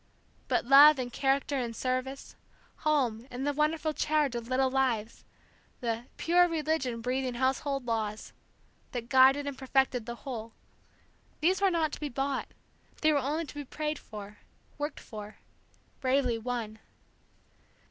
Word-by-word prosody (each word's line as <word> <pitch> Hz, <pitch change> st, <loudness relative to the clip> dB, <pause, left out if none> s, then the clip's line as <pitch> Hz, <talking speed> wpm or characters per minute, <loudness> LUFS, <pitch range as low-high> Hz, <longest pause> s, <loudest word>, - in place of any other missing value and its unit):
But -, -, +1 dB
love 285 Hz, +3 st, +9 dB
and 245 Hz, -2 st, -4 dB
character 275 Hz, +1 st, +1 dB
and 235 Hz, -2 st, -3 dB
service, 255 Hz, +3 st, -3 dB, 0.4 s
home 255 Hz, -6 st, 0 dB
and 255 Hz, +2 st, -4 dB
the 290 Hz, -, +1 dB
wonderful 305 Hz, +1 st, 0 dB
charge 300 Hz, -3 st, +1 dB
of 235 Hz, -1 st, -4 dB
little 260 Hz, +1 st, +1 dB
lives, 240 Hz, -5 st, 0 dB, 0.6 s
the 230 Hz, -1 st, -2 dB
"pure 355 Hz, +1 st, +4 dB
religion 310 Hz, -7 st, -1 dB
breathing 255 Hz, +1 st, -1 dB
household 265 Hz, +1 st, 0 dB
laws" 220 Hz, -2 st, -3 dB, 0.6 s
that 240 Hz, -1 st, -4 dB
guided 265 Hz, +2 st, +6 dB
and 285 Hz, -1 st, -4 dB
perfected 265 Hz, -3 st, 0 dB
the 235 Hz, -, -4 dB
whole, 230 Hz, -4 st, -5 dB, 0.9 s
these 365 Hz, +5 st, +2 dB
were 395 Hz, -, +5 dB
not 325 Hz, -4 st, +1 dB
to -, -, -7 dB
be 295 Hz, -, -3 dB
bought, 270 Hz, +1 st, -2 dB, 0.5 s
they 310 Hz, -, +4 dB
were 290 Hz, -, +3 dB
only 300 Hz, +5 st, -1 dB
to -, -, -10 dB
be 290 Hz, 0 st, -5 dB
prayed 300 Hz, +2 st, -3 dB
for, 210 Hz, -1 st, -10 dB, 0.4 s
worked 295 Hz, 0 st, -3 dB
for, 210 Hz, -1 st, -9 dB, 0.6 s
bravely 255 Hz, -3 st, +1 dB
won. 225 Hz, -2 st, -4 dB
265 Hz, 145 wpm, -30 LUFS, 240-295 Hz, 0.9 s, love